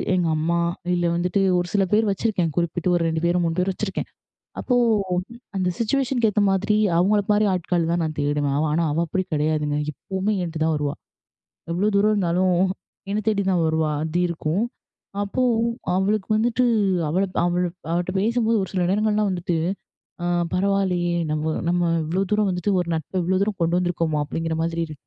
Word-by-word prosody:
எங்க 175 -2 +1
அம்மா 170 +2 0 0.4
இல்ல 175 0 0
வந்துட்டு 180 +3 0 0.2
ஒரு 175 - -2
சில 200 -1 +3
பேர் 215 -1 +3
வச்சுருக்கேன் 190 -5 0
குறிப்பிட்டு 175 +1 0
ஒரு 170 - +1
2 160 0 -1
பேரு, 175 +1 +2
3 165 0 -1
பேரு 190 +1 +1
வச்சிருக்கேன். 195 0 -4 0.5
அப்போ 250 - 0 0.8
அந்த 185 -1 +1
சிச்சுவேஷன்க்கு 245 -1 +1
ஏத்த 210 - +2
மாதிரி 205 +2 +1 0.2
அவங்கள 205 +3 +3
மாதிரி 210 0 +3
ஆட்கள் 175 -2 0
தான் 170 -1 +1
நான் 155 -1 -4
தேடுவேன். 145 -1 0
அவ 155 - +1
ஆனா, 165 0 +2
அவ 160 - 0
அப்படி 185 +3 -1
கிடையாதுங்க. 150 -1 0
இப்பவுமே 195 +8 -2
என்ட்ட 165 -1 -5
தான் 160 -1 +2
வருவா. 145 -1 -2 0.8
எவ்வளவு 200 +4 0
தூரம் 210 +2 +4
இருந்தாலும், 180 -2 +1 0.5
என்ன 210 +1 0
தேடி 205 -2 +1
தான் 175 -3 +2
வருவா, 160 -1 +1
அது 160 +2 -2
இருக்கும். 170 +4 -1 0.6
அப்போ 205 +5 -3 0.6
அவளுக்கு 195 +1 0
வந்துட்டு 235 +3 +1 0.4
அவள 180 +5 +1 0.2
அவள்ட்ட 175 0 -1
பேசும்போது 230 +1 +1
ஒரு - - -5
சில, 180 -2 0
நேரங்கள்லாம் 210 +1 +1
வந்துட்டு 175 -2 -1 0.7
அ - - -1 0.3
பரவால்லயே, 185 -2 +1 0.2
நம்ம 155 +1 -1 0.2
நம்ம 175 -1 +1
இவ்வளோ 180 +5 0
தூரம் 210 -2 +2
வந்துட்டு, 180 +3 -1
ஒரு 175 - -5
நட்ப 175 +4 -3
இவ்வளோ 185 +2 +1
தூரம் 205 -3 -3
கொண்டு 170 +1 +2
வந்துருக்கோமா, 170 -3 -1
அப்படீங்குற 165 +2 -3
மாதிரி 165 0 -2
இரு 155 - -8
180 Hz, 170 wpm, -23 LUFS, 165-200 Hz, 0.8 s, தூரம்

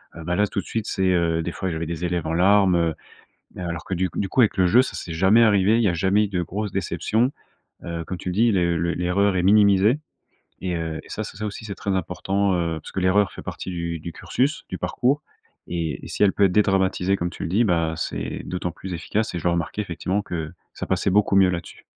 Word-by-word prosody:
Heu, 85 - -8
bah, 90 +2 -1
là 105 - +3
tout 100 - -3
de - - -5
suite, 110 -2 -3
c'est, 95 0 0
heu, 85 -2 +1
des 85 - -3
fois, 95 +1 -3
j'avais 80 0 -3
des 85 +1 -3
élèves 85 -3 -1
en 80 - -1
larmes, 95 +1 +4
heu, 85 -2 +1 0.6
heu, - - -7
alors 85 -1 -4
que 95 - -3
du 90 0 0
coup - - -8
du 100 - -1
coup, 130 - +2
avec 110 - +3
le 95 -1 +4
jeu, 120 +8 +6
ça - - -5
c'est 85 - -6
jamais 95 +7 +4
arrivé. 105 0 +4
Il 120 - +2
y - - +4
a 85 - 0
jamais 95 +5 +2
eu - - -3
de 90 -3 -1
grosses 100 +4 -4
déceptions. 100 +6 0 0.5
Heu, 85 -1 -4
comme 90 +2 -5
tu - - -6
le 90 - -4
dis, 115 +3 +4
les 85 -3 +2
le 85 +1 0
l'erreur 95 +2 +1
est 90 - +1
minimisée 105 +4 +5 0.6
et, 90 -2 -2
heu, 80 -1 -3
et - - -17
ça 110 - -4
c'est 100 - -9
ça 105 - -4
aussi 105 +1 -6
c'est 100 -2 -5
très 100 - -4
important, 95 +2 0
heu, 85 -2 -1
parce - - -10
que - - -4
l'erreur 95 +1 +3
fait - - -9
partie - - -6
du 85 -2 -3
du 85 +1 -7
cursus, 140 +4 -1
du 90 - -5
parcours 125 +10 0 0.5
et 80 -6 -3
et - - -9
si - - -2
elle 100 - +5
peut 100 - +3
être 95 - +3
dédramatisée, 95 -1 +2
comme 90 -2 -2
tu - - -9
le - - -2
dis, 105 +7 +2
bah, 85 -5 +1
c'est - - -4
d'autant 90 -1 -3
plus 90 +2 -7
efficace 105 +5 -2
et - - -1
je - - -13
le 85 - +3
remarquais 85 +4 -2
effectivement 95 +2 -2
que 80 -4 -5 0.2
ça - - -5
passait 95 - 0
beaucoup 100 0 +3
mieux 95 -1 +5
là-dessus. 85 -1 -6
95 Hz, 260 wpm, -23 LUFS, 85-100 Hz, 0.6 s, jeu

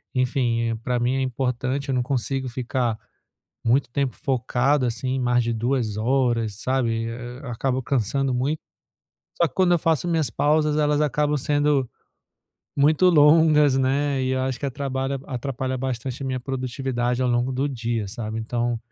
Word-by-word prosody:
enfim, 120 -3 +1
para 125 0 0
mim 120 +2 +1
é 135 - 0
importante 130 +2 -2
eu 135 - +1
não 125 - +1
consigo 135 0 -2
ficar 120 -2 -2 0.6
muito 125 +2 +2
tempo 135 0 -1
focado 130 +1 +1
assim 130 +3 -2
mais 125 -1 +2
de 115 - -1
2 115 -2 -1
horas 120 -2 +1
sabe 130 +2 0
e 115 0 -1
e - - -3
a 115 - -5 0.3
eu - - -6
acabo 130 +2 -1
cansando 135 +2 0
muito, 140 +5 -1 0.8
só 170 - +4
que - - -16
quando 185 -2 +3
eu 175 - +3
faço 165 +1 +1
minhas 165 -4 +1
pausas 150 0 +2
elas 150 -1 +2
acabam 150 0 +1
sendo 145 -1 +1 0.9
muito 155 +6 +4
longas, 150 -3 +5
né, 135 +1 +1
e 130 - 0
eu 130 0 0
acho 130 -2 -2
que 140 - -3
eh - - 0
atrapalha 135 0 -3
atrapalha 130 0 -3
bastante 130 0 -4
a - - -3
minha 130 -1 -2
produtividade 125 -1 -2
ao 125 - +1
longo 120 +2 +1
do 135 +3 0
dia 115 -4 -2
sabe, 110 0 -5
então 120 +1 -1
130 Hz, 175 wpm, -24 LUFS, 120-140 Hz, 0.9 s, longas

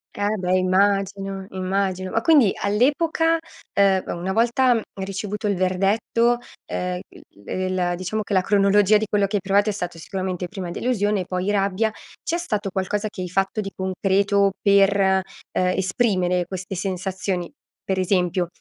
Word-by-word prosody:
Eh 205 +1 0
beh, 180 0 +1
immagino, 195 +1 +1
immagino. 185 0 -2
Ma - - +1
quindi 295 - +5
all'epoca, 305 +10 +2 0.4
uhm, 195 -1 +4
una 180 +2 -3
volta 235 +1 +3
ricevuto 200 +2 -4
il 200 - +1
verdetto, 200 +6 +1 0.3
ehm, 180 0 -3 0.5
il 185 0 -2
ehm 175 -1 0
diciamo 185 +5 -3
che 205 - -4
la 190 - +4
cronologia 200 +1 +4
di 215 - -1
quello 205 -1 +1
che 205 - -3
hai 200 - +1
provato 200 +2 +2
è - - -1
stato 175 -4 -5
sicuramente 185 +1 -4
prima 185 -2 -6
delusione, 205 -3 0
poi 185 +2 -2
rabbia. 200 +2 +1 0.3
C'è 340 - -1
stato 210 - -2
qualcosa 205 +3 -2
che 195 - -8
hai 180 - -4
fatto 195 +4 0
di 195 -1 -6
concreto 195 +1 +1
per, 200 0 +4
ehm, 190 -1 +3 0.3
esprimere 185 -1 +1
queste 190 +1 -6
sensazioni? 185 -1 -3 0.3
Per 190 -1 -1
esempio, 180 -1 +1
195 Hz, 150 wpm, -23 LUFS, 185-210 Hz, 0.5 s, quindi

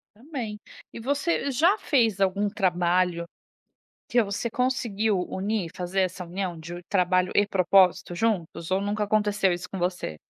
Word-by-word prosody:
Também. 235 -5 -6 0.3
E - - -7
você 280 +4 0
já 330 +10 +4
fez 225 -8 +1
algum 200 +2 +2
trabalho 180 -3 +1 0.8
que 240 -1 +3
você 210 +3 -3
conseguiu 225 -6 0
unir, 200 -2 -2
fazer 180 +2 -1
essa 185 0 -3
união 175 -1 -4
de 170 +2 -8
o 175 - -8
trabalho 185 -1 +2
e 205 0 +4
propósito 185 -2 +3
juntos, 175 -5 -1
ou 190 +1 +2
nunca 205 +1 -1
aconteceu 205 -2 +2
isso 175 0 -5
com 195 - -5
você? 175 - -2
195 Hz, 150 wpm, -26 LUFS, 180-220 Hz, 0.8 s, já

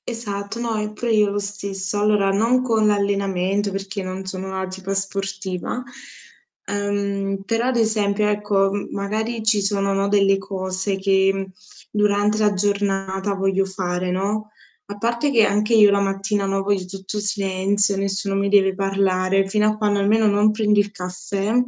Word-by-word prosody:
Esatto, 220 -2 -5
no, 230 -2 -2
e 210 0 -4
pure 235 +2 -2
io 210 -2 +4
lo 200 - -2
stesso. 200 0 -4
Allora 210 -2 +3
non 230 +6 +2
con 225 -3 +2
l'allenamento, 200 -1 0
perché 195 0 -4
non 185 +1 -5
sono 190 0 -5
una 190 0 -3
tipa 190 +1 -5
sportiva, 195 +2 -3 0.8
uhm, 200 -1 -2
però 230 +3 0
ad 260 - 0
esempio 210 -2 +1
ecco, 205 -2 +1
m 205 - -3
magari 220 +3 -3
ci 215 -1 +3
sono 200 0 0
no, 195 0 +1
delle 195 -1 +3
cose 190 0 -3
che 195 0 +1 0.4
durante 210 0 +2
la 210 -1 +3
giornata 195 0 -1
voglio 195 0 +1
fare, 180 -1 -3
no? 205 +4 -2 0.4
A 205 0 -7
parte 235 +6 0
che 225 -5 +5
anche 210 +3 +1
io 210 -2 +7
la 200 0 +2
mattina 195 +1 -1
no, 195 0 -1
poi 200 0 +1
c 185 - -7
c 190 +1 -9
c'è 210 +2 -3
silenzio, 200 0 +1
nessuno 195 0 -2
mi 200 0 +1
deve 195 -1 +4
parlare, 195 0 +1
fino 210 +2 +2
a 215 0 0
quando 205 -1 +1
almeno 215 +3 +3
non 205 +1 +4
prendi 210 -1 +2
il 205 0 +2
caffè 185 +2 -3
200 Hz, 170 wpm, -21 LUFS, 195-210 Hz, 0.8 s, io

